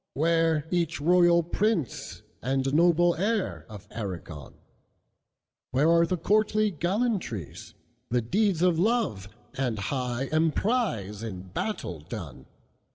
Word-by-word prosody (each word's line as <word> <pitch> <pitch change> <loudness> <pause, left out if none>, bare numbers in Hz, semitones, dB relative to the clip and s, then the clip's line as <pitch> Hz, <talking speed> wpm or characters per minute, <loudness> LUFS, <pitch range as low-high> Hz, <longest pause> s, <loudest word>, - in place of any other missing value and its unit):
WhereEach 165 +1 +1
royal 175 +2 +4
prince 175 - -2 0.2
and 135 +1 0
noble 175 +2 +4
heirOf 185 - -3
Aragon? 90 - -7 1.1
Where 145 +6 +3
are 170 0 +4
the 185 - -1
courtly 215 +3 +2
gallantries? 175 - -2 0.3
The 120 0 +1
deeds 190 - +1
of 175 -3 +3
love 190 - 0 0.2
and 125 -4 -1
high 125 +3 -2
emprise, 155 - 0
In 95 -5 -7
battle 90 - -4
done? 75 - -8
165 Hz, 100 wpm, -27 LUFS, 120-185 Hz, 1.1 s, royal